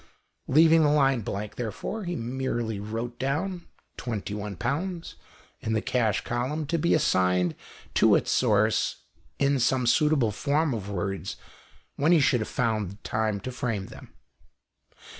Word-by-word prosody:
Leaving 160 Hz, +3 st, +6 dB
the 150 Hz, -, +4 dB
line 135 Hz, -4 st, +3 dB
blank, 105 Hz, +1 st, -5 dB
therefore, 125 Hz, -, -4 dB
he 175 Hz, 0 st, -2 dB
merely 120 Hz, -3 st, -2 dB
wrote 115 Hz, +3 st, -5 dB
down 170 Hz, +7 st, -2 dB, 0.3 s
£21 120 Hz, -, -3 dB, 0.5 s
in 110 Hz, -, -2 dB
the 110 Hz, -, +2 dB
cash 110 Hz, -3 st, 0 dB
column, 130 Hz, +6 st, -2 dB
to 165 Hz, +3 st, -1 dB
be 170 Hz, -, +3 dB
assigned 90 Hz, -, +2 dB, 0.4 s
to -, -, +5 dB
its -, -, +1 dB
source 110 Hz, -2 st, +2 dB, 0.3 s
in 140 Hz, 0 st, +2 dB
some 125 Hz, +1 st, +2 dB
suitable 140 Hz, -2 st, +3 dB
form 145 Hz, +6 st, 0 dB
of 100 Hz, -3 st, -5 dB
words 95 Hz, 0 st, -3 dB, 0.6 s
when 150 Hz, +4 st, +3 dB
he 170 Hz, -, +6 dB
should 135 Hz, -3 st, +3 dB
have 110 Hz, -, -4 dB
found 110 Hz, -5 st, -2 dB
time 110 Hz, -2 st, -1 dB
to 130 Hz, -, -6 dB
frame 115 Hz, -6 st, -2 dB
them. -, -, -12 dB
120 Hz, 140 wpm, -27 LUFS, 105-145 Hz, 0.6 s, Leaving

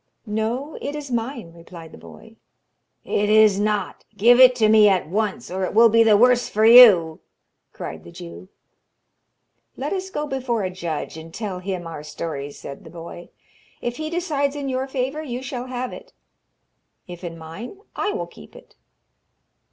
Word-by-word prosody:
'No, 230 Hz, +7 st, -3 dB
it 285 Hz, -, -4 dB
is 290 Hz, -3 st, -7 dB
mine,' 235 Hz, -6 st, -4 dB
replied 170 Hz, -1 st, -12 dB
the -, -, -13 dB
boy. 225 Hz, 0 st, -15 dB, 0.7 s
'It 205 Hz, 0 st, -1 dB
is 215 Hz, -2 st, +5 dB
not. 210 Hz, 0 st, -2 dB
Give 240 Hz, +4 st, +5 dB
it 255 Hz, -1 st, +8 dB
to 220 Hz, -3 st, +3 dB
me 215 Hz, -1 st, +6 dB
at 190 Hz, -4 st, +1 dB
once, 215 Hz, +5 st, -3 dB
or 190 Hz, +1 st, -3 dB
it 185 Hz, -, -3 dB
will 230 Hz, +1 st, +7 dB
be 230 Hz, +1 st, +4 dB
the 220 Hz, -2 st, +5 dB
worse 245 Hz, +1 st, +3 dB
for 215 Hz, +1 st, +1 dB
you!' 210 Hz, -10 st, +8 dB, 0.5 s
cried 80 Hz, +1 st, -8 dB
the -, -, -13 dB
Jew. 175 Hz, +1 st, -11 dB, 1.3 s
'Let -, -, -3 dB
us 380 Hz, 0 st, -4 dB
go 300 Hz, -5 st, -3 dB
before 255 Hz, -6 st, -2 dB
a 185 Hz, -, -3 dB
judge, 170 Hz, -4 st, -5 dB
and 160 Hz, +1 st, -10 dB
tell 195 Hz, -1 st, -5 dB
him 185 Hz, -2 st, -5 dB
our 165 Hz, -3 st, -7 dB
stories,' 145 Hz, -1 st, -6 dB
said 140 Hz, -, -10 dB
the -, -, -12 dB
boy. 170 Hz, +1 st, -10 dB, 0.5 s
'If 240 Hz, 0 st, -4 dB
he 310 Hz, 0 st, -4 dB
decides 300 Hz, -5 st, -1 dB
in 280 Hz, -2 st, -4 dB
your 260 Hz, +1 st, -2 dB
favour, 270 Hz, +3 st, -3 dB
you 255 Hz, -4 st, -6 dB
shall 255 Hz, -1 st, -6 dB
have 255 Hz, 0 st, -5 dB
it; -, -, -12 dB, 0.9 s
if 175 Hz, 0 st, -10 dB
in 165 Hz, -1 st, -6 dB
mine, 165 Hz, -, -9 dB, 0.2 s
I 415 Hz, -, -1 dB
will -, -, -4 dB
keep -, -, -16 dB
it!' -, -, -16 dB
220 Hz, 175 wpm, -22 LUFS, 175-255 Hz, 1.3 s, it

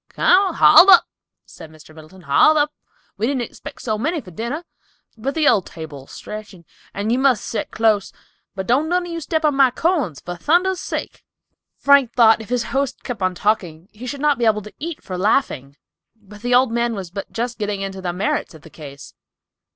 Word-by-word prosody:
"Come, 385 Hz, +1 st, +2 dB
haul 385 Hz, -, +7 dB
up," 365 Hz, -, +8 dB, 0.4 s
said 160 Hz, -, -13 dB
Mr. 155 Hz, 0 st, -17 dB
Middleton, 160 Hz, +4 st, -15 dB
"haul 175 Hz, -, +4 dB
up; 295 Hz, 0 st, +1 dB, 0.4 s
we 220 Hz, +3 st, 0 dB
didn't 265 Hz, -2 st, -1 dB
expect -, -, -10 dB
so 215 Hz, -3 st, -2 dB
many 315 Hz, +7 st, -1 dB
to 190 Hz, -10 st, -12 dB
dinner, 235 Hz, -, -5 dB, 0.5 s
but 265 Hz, +5 st, -4 dB
the 310 Hz, -2 st, +2 dB
old 195 Hz, -5 st, +3 dB
table'll 150 Hz, -5 st, -10 dB
stretch 215 Hz, -1 st, -9 dB, 0.4 s
and 205 Hz, +3 st, -3 dB
you 245 Hz, -, +1 dB
must 260 Hz, -5 st, +2 dB
set 225 Hz, -, -4 dB
clus; 215 Hz, -3 st, +1 dB, 0.4 s
but 190 Hz, -1 st, -4 dB
don't 275 Hz, +8 st, +1 dB
none 360 Hz, 0 st, 0 dB
of 350 Hz, -, -7 dB
you 335 Hz, -, -4 dB
step 315 Hz, +1 st, -1 dB
on 300 Hz, -, +3 dB
my 270 Hz, -1 st, +4 dB
corns, 275 Hz, -, -1 dB
for 175 Hz, -, -7 dB
thunder's 350 Hz, -, +1 dB
sake!" -, -, -6 dB, 0.5 s
Frank 280 Hz, -4 st, +4 dB
thought 225 Hz, -2 st, +5 dB
if 220 Hz, -, -11 dB
his 245 Hz, -1 st, 0 dB
host 275 Hz, -1 st, -2 dB
kept 245 Hz, -6 st, -6 dB
on 185 Hz, -1 st, 0 dB
talking 180 Hz, -4 st, -2 dB
he 240 Hz, +4 st, -10 dB
should 275 Hz, +2 st, -5 dB
not 295 Hz, -3 st, +2 dB
be 235 Hz, -, +1 dB
able 210 Hz, -2 st, +2 dB
to 210 Hz, -, -12 dB
eat 330 Hz, +1 st, -6 dB
for 185 Hz, -1 st, -6 dB
laughing, 145 Hz, -, 0 dB, 0.4 s
but 210 Hz, -1 st, -16 dB
the 245 Hz, +1 st, +1 dB
old 250 Hz, -1 st, +3 dB
man 235 Hz, 0 st, -1 dB
was 185 Hz, -4 st, -7 dB
but 200 Hz, +1 st, -7 dB
just 235 Hz, 0 st, -4 dB
getting 205 Hz, -2 st, -3 dB
into 195 Hz, -1 st, -5 dB
the 180 Hz, -1 st, -2 dB
merits 180 Hz, -2 st, -2 dB
of 155 Hz, -, -16 dB
the 160 Hz, -, -15 dB
case! 140 Hz, -3 st, -11 dB
225 Hz, 205 wpm, -20 LUFS, 190-280 Hz, 0.5 s, up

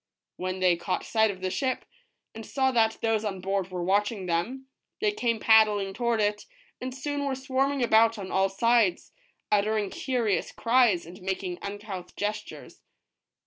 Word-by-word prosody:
When 185 Hz, +1 st, -4 dB
they 180 Hz, -2 st, +4 dB
caught 185 Hz, +2 st, -3 dB
sight 220 Hz, -1 st, +2 dB
of 190 Hz, -2 st, -6 dB
the 185 Hz, 0 st, -2 dB
ship, 260 Hz, +3 st, -1 dB, 0.5 s
and 225 Hz, -, -8 dB
saw 265 Hz, +4 st, 0 dB
that 225 Hz, -3 st, +2 dB
those 225 Hz, -1 st, +1 dB
on 195 Hz, -3 st, -3 dB
board 190 Hz, 0 st, -2 dB
were 180 Hz, -1 st, -4 dB
watching 200 Hz, +2 st, 0 dB
them, 180 Hz, +11 st, -2 dB, 0.3 s
they 425 Hz, -1 st, +2 dB
came 235 Hz, -, -1 dB
paddling 210 Hz, -3 st, +4 dB
toward 235 Hz, +1 st, 0 dB
it, 210 Hz, 0 st, 0 dB, 0.3 s
and 255 Hz, +1 st, -4 dB
soon 285 Hz, +2 st, -3 dB
were 275 Hz, -1 st, -1 dB
swarming 270 Hz, 0 st, 0 dB
about 225 Hz, 0 st, +4 dB
on 190 Hz, -2 st, -6 dB
all 190 Hz, 0 st, +2 dB
sides, 225 Hz, -1 st, +2 dB, 0.4 s
uttering 210 Hz, -1 st, +1 dB
curious 240 Hz, -7 st, -1 dB
cries, 230 Hz, -8 st, +3 dB
and 180 Hz, +4 st, -12 dB
making 185 Hz, -1 st, -3 dB
uncouth 200 Hz, -3 st, -7 dB
gestures. 210 Hz, +1 st, -5 dB
210 Hz, 160 wpm, -27 LUFS, 190-240 Hz, 0.5 s, they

